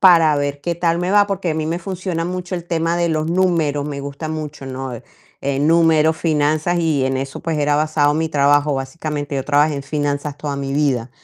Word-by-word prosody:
para 165 -5 +6
ver 145 0 -2
qué 170 +3 -2
tal 170 0 +1
me 180 +1 -1
va, 205 0 +5
porque 195 -3 -2
a - - -1
mí 155 0 -2
me 170 +2 -1
funciona 180 -2 -3
mucho 180 +1 -4
el 175 -2 -4
tema 165 0 0
de 170 0 +1
los 155 0 0
números, 170 -6 +1
me 145 -2 -4
gusta 140 +3 -6
mucho, 155 -3 -5
¿no? 130 0 -5 0.5
Eh, 140 0 -1
números, 160 0 +4
finanzas 155 +2 +1
y 155 -5 +1
en 130 0 0
eso, 135 0 -5
pues, 165 -2 -2
era 145 0 +2
basado 150 -1 +2
mi 160 +1 0
trabajo. 145 0 +3
Básicamente, 145 +1 -4
yo 135 - -2
trabajé 150 +1 +3
en 140 - -4
finanzas 145 0 -2
toda 145 -2 -3
mi 135 -1 -3
vida. 135 -5 0
155 Hz, 215 wpm, -19 LUFS, 145-170 Hz, 0.5 s, para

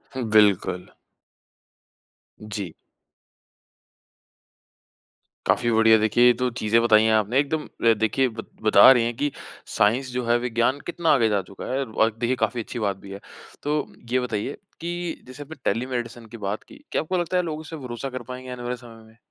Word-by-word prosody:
हुँ, 130 - -2
बिल्कुल। 100 -4 +3 1.5
जी। 100 -5 -6 2.7
काफ़ी 120 -1 +2
बढ़िया 110 0 +6
देखिए 110 +3 +3
ये 125 - +7
तो 125 +1 -1
चीज़ें 115 +2 +3
बताई 110 -2 +5
है 110 - +3
आपने 110 +5 +2
एकदम 150 +2 -1 0.2
अ, 115 -1 +6
देखिए 110 +5 +1
बत 115 -1 -9
बता 110 +4 +8
रहे 125 -3 +4
हैं 120 0 -2
कि 145 -1 0 0.5
साइंस 125 +6 +2
जो 125 0 -2
है 120 +1 +3
विज्ञान 120 +3 0
कितना 170 -1 -1
आगे 115 -5 +3
जा 100 -2 +1
चुका 100 - -9
है 135 +1 0
और 110 -1 +1
देखिए 120 +2 +1
काफ़ी 120 -2 -4
अच्छी 120 - -6
बात 100 -3 -1
भी 100 - -9
है। 100 - -7 0.4
तो 150 +1 0 0.3
ये 130 - +3
बताइए 125 +1 -3 0.2
कि 175 0 -4
जैसे 130 +3 -9
आपने 160 +3 -10 0.2
टेलीमेडि़सिन 120 0 -4
की 115 +1 -10
बात 100 0 -4
की, 290 - -17
क्या - - +1
आपको 180 +4 -2
लगता 175 +1 0
है 180 - +2
लोग 155 -2 -4
उससे 160 +1 -8
भरोसा 125 0 -6
कर 130 -1 -6
पाएँगे 130 0 -9
आने 125 -1 -7
वाले 120 +1 -2
समय 115 -2 -14
में? 110 +1 -20
120 Hz, 185 wpm, -24 LUFS, 110-130 Hz, 2.7 s, बता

